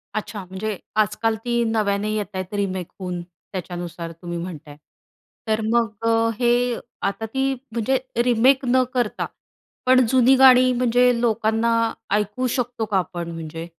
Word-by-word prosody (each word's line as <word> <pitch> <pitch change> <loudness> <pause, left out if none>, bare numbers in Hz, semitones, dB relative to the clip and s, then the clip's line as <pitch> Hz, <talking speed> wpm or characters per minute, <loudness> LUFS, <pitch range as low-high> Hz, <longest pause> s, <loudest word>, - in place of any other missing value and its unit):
अच्छा. 210 -1 -4
म्हणजे 190 +3 -4 0.2
आजकाल 215 +2 0
ती 235 -1 +1
नव्याने 210 -2 0
येतायेत 190 -2 -4
रिमेक 190 -3 -2
होऊन 180 -2 -4
त्याच्यानुसार 175 -1 -7
तुम्ही 175 +1 -7
म्हणताय. 160 -4 -7 0.7
तर 220 0 +1
मग 230 0 +1 0.2
अ, 230 0 +3
हे 245 0 +2 0.3
आता 200 +3 -2
ती 265 +4 0 0.2
म्हणजे 235 +4 +1 0.3
रिमेक 250 +3 +3
न 255 +1 +3
करता, 245 -4 -1 0.6
पण 255 0 +5
जुनी 255 +2 +5
गाणी 255 -1 +7
म्हणजे 245 0 +3
लोकांना 225 0 +1 0.4
ऐकू 210 +5 -1
शकतो 245 -2 -2
का 205 -2 0
आपण? 175 -2 -3
म्हणजे, 165 0 -6
220 Hz, 135 wpm, -22 LUFS, 185-245 Hz, 0.7 s, गाणी